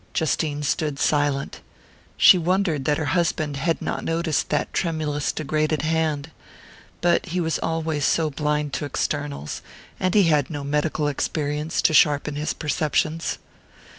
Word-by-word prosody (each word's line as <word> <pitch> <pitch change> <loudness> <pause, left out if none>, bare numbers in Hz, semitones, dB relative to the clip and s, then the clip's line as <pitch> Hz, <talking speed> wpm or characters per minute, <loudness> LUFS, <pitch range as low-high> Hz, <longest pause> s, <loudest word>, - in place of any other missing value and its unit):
Justine 150 -2 0
stood 150 0 -1
silent. 145 -2 0 0.6
She - - +8
wondered 175 -5 0
that 150 -1 +2
her 155 - -2
husband 155 -5 0
had 165 +4 -1
not - - -3
noticed 165 -3 0
that - - -1
tremulous 155 -4 -1
degraded 155 0 -1
hand. 160 -2 0 0.7
But 175 +2 +2
he 180 +1 -2
was 165 -2 0
always 160 -2 -1
so 155 +1 +2
blind 150 0 -1
to 145 - -2
externals 145 - -3 0.4
and 185 +1 0
he 205 - +6
had 150 -5 +2
no 145 -3 -5
medical 150 +1 0
experience 150 +2 -2
to - - +4
sharpen 150 0 +4
his 150 +1 -2
perceptions. 155 +1 -1
155 Hz, 140 wpm, -23 LUFS, 145-160 Hz, 0.7 s, She